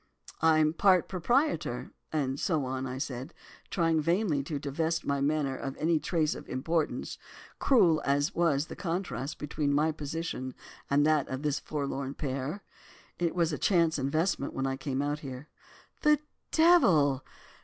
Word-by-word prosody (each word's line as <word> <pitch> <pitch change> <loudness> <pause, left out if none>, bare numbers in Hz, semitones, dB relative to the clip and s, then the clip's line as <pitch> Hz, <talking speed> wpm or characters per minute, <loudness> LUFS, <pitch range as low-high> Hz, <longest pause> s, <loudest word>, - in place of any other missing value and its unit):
"'I'm 155 -1 +5
a - - -4
part 185 0 +4
proprietor, 180 - 0 0.2
and 140 -3 -1
so 155 -7 0
on,' 130 0 -3
said 130 -1 -5
I, - - -34 0.3
trying 165 -3 +2
vainly 170 -2 +1
to 145 +2 -4
divest 160 +4 -2
my 140 -1 0
manner 145 -2 +1
of 135 +1 -5
any 160 0 +2
trace 155 0 0
of - - -10
importance, 155 +5 -2 0.4
cruel 180 - +4
as 145 +5 +1
was 155 -4 +2
the - - -9
contrast 165 - -3
between 150 0 -1
my 150 +3 +3
position 150 -3 -4 0.3
and 145 +1 +4
that 155 -2 +3
of 130 +2 -4
this 150 -1 0
forlorn 140 -2 -4
pair. 140 +6 -3 0.6
'It 170 -1 0
was 170 -2 +1
a - - -3
chance 170 -5 +3
investment 140 +2 0
when 135 - -1
I 135 0 0
came 135 0 -2
out 145 +1 -1
here.' 135 0 -8 0.5
"'The 300 0 +5 0.3
devil! 175 - +5
150 Hz, 155 wpm, -29 LUFS, 140-165 Hz, 0.6 s, I'm